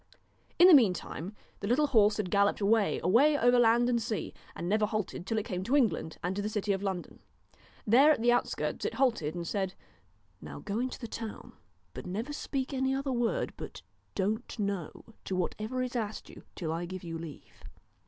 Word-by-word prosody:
In 355 - +8
the 370 - +9
meantime 200 - +2 0.2
the 200 - -4
little 260 +7 +3
horse 215 -7 +4
had 200 -4 -2
galloped 200 0 +3
away, 210 0 +2
away 275 - +5
over 245 -1 +4
land 240 +1 +4
and 240 -1 +1
sea, 225 -1 -3 0.2
and 170 - -4
never 210 +2 +2
halted 210 -4 -4
till 225 - -1
it 215 - -1
came 185 -6 -3
to 260 - +1
England 225 - +1
and 180 +2 -1
to 205 - -1
the 210 - -2
city 210 -1 -1
of 195 - -3
London. 190 -3 -4 0.7
There, 255 +8 +6
at 300 -5 +4
the 240 +1 +3
outskirts, 245 - -1
it - - -2
halted, 230 - +1
and 170 -1 -4
said: 190 -1 -2 0.7
Now 75 -2 -8
go 200 - -3
into 255 +1 -2
the 235 - -7
town, 225 -1 -7 0.4
but - - -8
never 220 +11 -4
speak 275 -2 -3
any 265 0 +1
other 270 0 -2
word 240 -2 0
but - - -8 0.3
Don't 215 +6 -2
know 200 -6 -3 0.2
to 190 - -2
whatever 215 +7 -2
is 250 0 -5
asked 220 -3 -4
you, - - -14
till 165 -4 -3
I 170 +1 -3
give 185 +1 -7
you 165 -1 -5
leave.' 160 -3 -11
215 Hz, 200 wpm, -30 LUFS, 190-245 Hz, 0.7 s, the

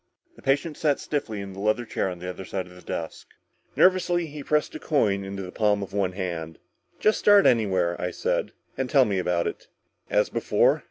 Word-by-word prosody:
The - - -16
patient 145 +3 0
sat 145 -3 +1
stiffly 110 -8 -3
in 100 -1 -7
the 95 - -9
leather 110 +4 +1
chair 95 - -1
on 90 - -6
the 90 +1 -7
other 90 +1 -6
side 95 0 -4
of 90 - -15
the 90 - -14
desk. 80 -2 -6 0.5
Nervously 180 -2 +3
he 150 -1 -8
pressed 150 +1 0
a - - -6
coin 105 -10 +1
into 95 0 -5
the 90 - -7
palm 105 -1 +1
of 100 - -9
one 95 -2 0
hand. 85 -4 -4 0.4
"Just 215 - +3
start 205 -1 +6
anywhere," 95 -7 +3
I 90 - -1
said, - - -1 0.3
"and 130 -1 -1
tell 135 -3 +5
me 100 -4 -1
all - - +1
about 90 -1 0
it." - - -5 0.4
"As - - +2
before?" - - +2
100 Hz, 215 wpm, -25 LUFS, 90-140 Hz, 0.5 s, start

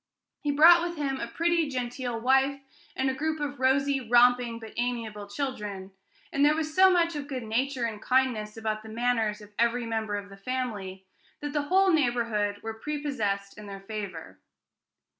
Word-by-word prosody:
He 295 - -3
brought 325 +4 +7
with 345 -1 -3
him 275 -3 -2
a - - -3
pretty, 335 +3 +1
genteel 245 -2 -3
wife, 270 +3 +2 0.4
and 265 - 0
a 265 - +1
group 310 +3 -2
of 285 -2 -4
rosy, 270 +1 +2
romping, 245 -1 +4
but 225 -1 -10
amiable 230 -4 -3
children; 205 -5 -5 0.4
and 280 - +2
there 300 +1 +5
was 310 -1 -3
so 380 0 +7
much 340 -3 +2
of 285 -1 -5
good 260 -4 -4
nature 250 +3 -1
and 220 -2 -5
kindness 245 -5 +1
about 215 -1 -2
the 220 - -11
manners 225 -2 0
of 210 0 -14
every 235 +1 +2
member 220 -2 -2
of 205 0 -5
the 195 - -12
family, 200 -5 -4 0.4
that 290 -1 -4
the 295 - +1
whole 380 0 +4
neighborhood 230 -7 0
were 225 0 -4
prepossessed 220 -10 -3
in 210 - -10
their 195 -1 -8
favor. 195 -5 -7
245 Hz, 180 wpm, -28 LUFS, 215-285 Hz, 0.4 s, brought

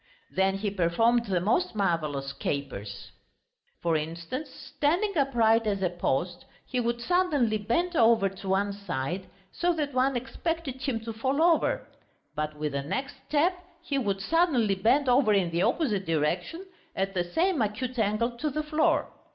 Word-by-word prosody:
Then 190 0 +1
he 205 0 -2
performed 225 +6 +2
the 190 -4 0
most 230 - +1
marvellous 155 -8 -1
capers. 130 -8 -5 0.7
For 170 -1 +2
instance, 165 - -4
standing 355 +8 -1
upright 230 -6 +3
as 200 -2 0
a 180 - +1
post, 175 +1 -2 0.2
he 255 - -2
would 235 0 -1
suddenly 290 -8 +1
bend 335 - 0
over 225 -5 +5
to 195 0 -7
one 200 +1 +1
side, 185 -2 -4 0.2
so 350 0 +1
that 295 -4 -2
one 260 +1 +2
expected 270 +2 -3
him 255 -5 -1
to 225 0 -6
fall 265 +6 -1
over; 335 -2 +2 0.5
but 150 0 -3
with 150 0 -2
the 140 0 -2
next 270 - -4
step 310 +5 +3 0.3
he 280 -2 -1
would 200 -5 -1
suddenly 270 - +2
bend 245 +9 +2
over 245 -3 +4
in 185 -4 +2
the 170 +1 0
opposite 215 - +1
direction 170 - -1 0.3
at 195 0 -1
the 180 -2 +1
same 325 - +1
acute 230 +4 -2
angle 215 +3 +1
to 305 - 0
the 305 +2 -2
floor. 315 +2 +2
225 Hz, 160 wpm, -28 LUFS, 185-280 Hz, 0.7 s, over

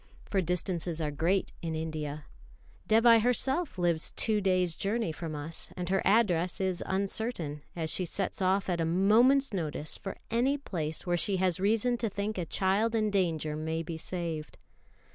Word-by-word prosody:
For 195 - 0
distances 175 -1 -1
are 150 -2 -1
great 170 +6 0
in 165 -1 -3
India. 155 -2 -4 0.6
Dévai 225 +1 +6
herself 265 - +1
lives 170 -3 +4
two 215 -2 +1
days' 185 -3 +1
journey 210 -2 -1
from 160 0 -6
us, 155 +3 -3
and 180 0 -3
her 195 0 +2
address 185 -5 +2
is 185 -2 -1
uncertain, 190 -6 -2
as 160 -2 -3
she 185 - -1
sets 195 +3 -2
off 190 +1 +2
at 175 -2 0
a - - +2
moment's 225 +10 +4
notice 155 -4 -3
for 195 - -6
any 255 +5 +2
place 160 - -4
where 175 -1 +1
she 195 +2 0
has 185 -2 +1
reason 225 +5 +2
to 230 -2 -1
think 205 0 -3
a 175 - -2
child 200 +6 +1
in 215 -1 +1
danger 165 -6 0
may 160 +1 -2
be 165 0 -5
saved. 160 -2 -4
185 Hz, 170 wpm, -30 LUFS, 165-210 Hz, 0.6 s, Dévai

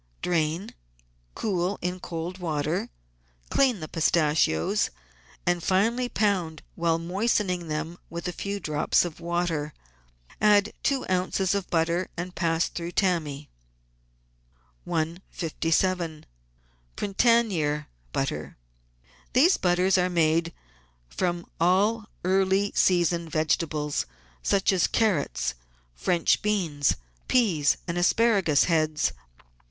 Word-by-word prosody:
Drain, 170 +1 0 0.6
cool 190 -1 -1
in 180 +1 -3
cold 170 +2 -5
water, 155 -1 -2 0.6
clean 255 -9 +3
the 155 - -5
pistachios, 155 - +2 0.6
and 175 0 +1
finely 230 +8 +1
pound 180 -9 0
while 165 -1 +1
moistening 180 0 0
them 160 +3 -4
with 170 +2 -5
a - - -1
few 200 +3 -4
drops 155 0 +1
of 170 -2 -7
water. 170 -3 -2 0.7
Add 205 0 +4
two 275 -2 0
oz. 185 +1 0
of 200 -2 -2
butter 170 +2 +1
and 180 +1 -4
pass 165 -2 +1
through 170 0 -6
tammy. 155 -7 -1 1.4
157— 165 0 -1 0.7
PRINTANIER 195 -9 +1 0.2
BUTTER - - -3 0.8
These 300 +10 +5
butters 180 +1 +2
are 180 0 +2
made 165 -1 +2 0.6
from 175 - -2
all 205 +6 +2 0.2
early 190 +2 +2
season 170 -2 +2
vegetables, 155 - 0 0.3
such 195 - +2
as 185 - +3
carrots, 140 - 0 0.4
French 165 - +1
beans, 175 -10 +1 0.3
peas, 180 - +3
and 170 0 -1
asparagus 190 -6 +3
heads. 155 -3 +1
175 Hz, 100 wpm, -26 LUFS, 160-195 Hz, 1.4 s, These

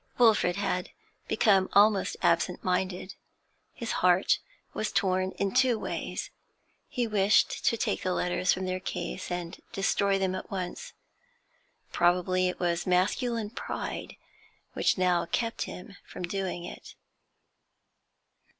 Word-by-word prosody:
Wilfrid 220 -7 +4
had 180 -2 -1 0.4
become 195 -3 +3
almost 205 -1 +4
absent 170 +2 +2
minded. 185 +1 -1 0.6
His 235 -2 -5
heart 180 +1 +4 0.3
was 215 - -2
torn 185 -1 +1
in 200 -1 -2
two 255 -2 +4
ways. - - -4 0.6
He 245 - -1
wished 210 -1 +2
to 230 - +3
take - - -1
the 185 - -1
letters 180 +1 +1
from 185 0 -1
their 185 0 -2
case 185 0 -5
and 175 -1 -4
destroy 195 0 +1
them 190 -1 0
at - - -6
once; 195 - -5 1.0
probably 180 +1 +2
it 180 - -6
was 175 0 0
masculine 210 +5 +1
pride - - -5 0.6
which - - +2
now 180 -2 +2
kept 230 +4 -1
him 195 +2 -9
from 180 - -9
doing 180 -1 -3
it. - - -10
185 Hz, 125 wpm, -28 LUFS, 180-205 Hz, 1.0 s, Wilfrid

